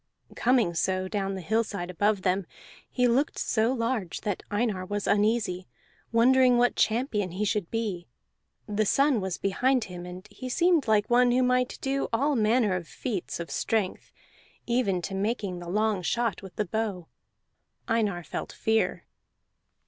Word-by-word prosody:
Coming 240 -8 +2
so, 185 +3 0
down 195 -1 -2
the 190 - -5
hillside 200 -2 -1
above 205 +2 +1
them, 185 -1 0 0.4
he 250 -1 +2
looked 260 +5 +1
so 225 +1 +1
large 230 -7 -2
that 205 -3 -2
Einar 205 -3 -1
was 205 +2 -3
uneasy, 205 -3 +1 0.4
wondering 250 +2 +5
what 245 0 +3
champion 215 -5 0
he 205 +3 -1
should 205 -4 -1
be; 210 -7 -3 0.6
the 210 0 0
sun 275 -3 +3
was 190 -2 -3
behind 250 +6 +1
him, 180 -3 -8
and 180 +3 -9
he 255 +5 -7
seemed 340 0 +2
like 215 -1 +3
one 245 +1 +4
who 250 +1 +3
might 250 0 +1
do 275 0 -1
all 280 +6 +1
manner 215 -3 +2
of 175 -2 -4
feats 205 -10 -4
of 170 - -6
strength, 215 -5 -1 0.5
even 220 -7 0
to 195 - -4
making 200 -2 -2
the 175 -1 -8
long 210 0 +1
shot 230 +2 -1
with 190 -2 -11
the 210 - -1
bow. 200 -3 -3 0.8
Einar 210 -6 0
felt - - -5
fear. 220 0 0
215 Hz, 155 wpm, -27 LUFS, 185-240 Hz, 0.8 s, wondering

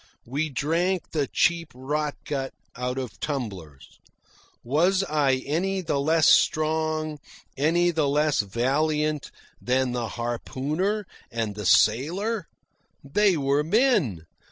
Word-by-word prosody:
We 145 +6 -2
drank 165 +7 -1
the 150 -4 0
cheap 165 +2 +1
rotgut 145 0 -3 0.2
out 125 +1 -3
of 130 -3 -5
tumblers. 95 - -6 0.6
Was 175 +10 +2
I 140 -6 +1
any 190 +6 -1
the 150 -5 -1
less 160 +2 +3
strong, 155 -1 +2 0.4
any 170 +5 +2
the 155 -4 +1
less 150 +1 +2
valiant, 150 +8 0 0.3
than 130 0 +1
the 120 -2 -2
harpooner 145 - -2 0.2
and 115 -3 -3
the 105 -2 -4
sailor? 175 - +2 0.6
They 185 +6 +2
were 140 +1 +1
men. 165 - +2
150 Hz, 110 wpm, -25 LUFS, 130-165 Hz, 0.6 s, less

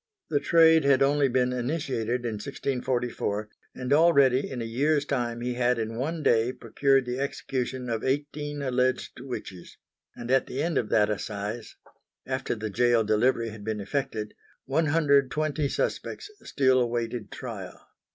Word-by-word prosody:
The 145 - +3
trade 160 +1 +5
had 140 -1 +4
only 140 0 +3
been 125 0 +1
initiated 125 -3 -2
in 110 -3 -3
1644, 125 -5 -2 0.3
and 125 +2 -1
already 140 -5 +4
in 130 - -5
a 115 - -3
year's 145 +6 +1
time 120 -4 -2
he 125 +1 -2
had 125 0 +1
in 115 0 -3
one 155 +6 -3
day 115 0 +3
procured 135 +4 +1
the 125 +1 -3
execution 130 -2 -3
of 115 -2 -2
eighteen 145 +1 -2
alleged 130 -1 0
witches; 120 -8 -8 0.4
and 120 +1 -5
at 135 0 +3
the 135 +3 -3
end 165 -3 +1
of 105 - -3
that 105 -1 +3
assize, 105 +2 -5 0.5
after - - -2
the 110 -1 -5
gaol 120 +2 +3
delivery 115 +2 +2
had 105 -1 -10
been 110 0 -3
effected, 105 -1 -3 0.3
one 155 +4 +1
hundred 145 -3 +4
and 130 - -19
twenty 150 -1 0
suspects 420 - -3
still 130 -2 +2
awaited 120 -2 -2
trial. - - -7
125 Hz, 160 wpm, -27 LUFS, 115-140 Hz, 0.5 s, trade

